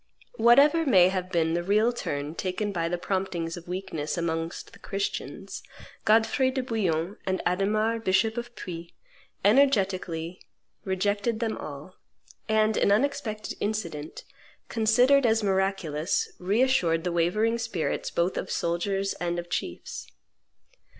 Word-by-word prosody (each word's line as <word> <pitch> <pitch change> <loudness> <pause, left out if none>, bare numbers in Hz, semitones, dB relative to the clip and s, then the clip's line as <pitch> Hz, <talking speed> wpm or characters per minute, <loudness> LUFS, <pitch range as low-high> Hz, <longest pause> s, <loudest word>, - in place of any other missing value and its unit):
Whatever 285 +7 +6
may 190 - +6
have 185 -1 -3
been 165 -2 +1
the 170 - 0
real 210 +6 +2
turn 145 -9 -4
taken 185 +4 -2
by 165 -3 -1
the 175 - -1
promptings 175 -3 -2
of 175 -1 -11
weakness 175 -5 -4
amongst 165 0 -3
the - - -15
Christians, 200 0 -4 0.4
Godfrey 225 +4 +3
de 260 0 -2
Bouillon 195 -7 -1
and 190 0 0
Adhemar, 215 +5 +1
bishop 220 +2 +2
of 240 0 -6
Puy, 170 -4 -8 0.5
energetically 190 -8 +2 0.5
rejected 205 +4 0
them 225 -2 -1
all; 150 +5 -9 0.5
and 215 0 +3
an - - +3
unexpected 220 -2 0
incident, 170 -8 -4 0.5
considered 245 +5 +4
as 220 -1 +2
miraculous, 190 -5 0
reassured 185 -5 +2
the 180 - -1
wavering 215 +8 +1
spirits 225 -8 -2
both 175 +2 0
of - - -3
soldiers 195 +4 -1
and 175 0 -1
of 175 0 -6
chiefs. 85 - -4
195 Hz, 130 wpm, -27 LUFS, 170-220 Hz, 0.5 s, Whatever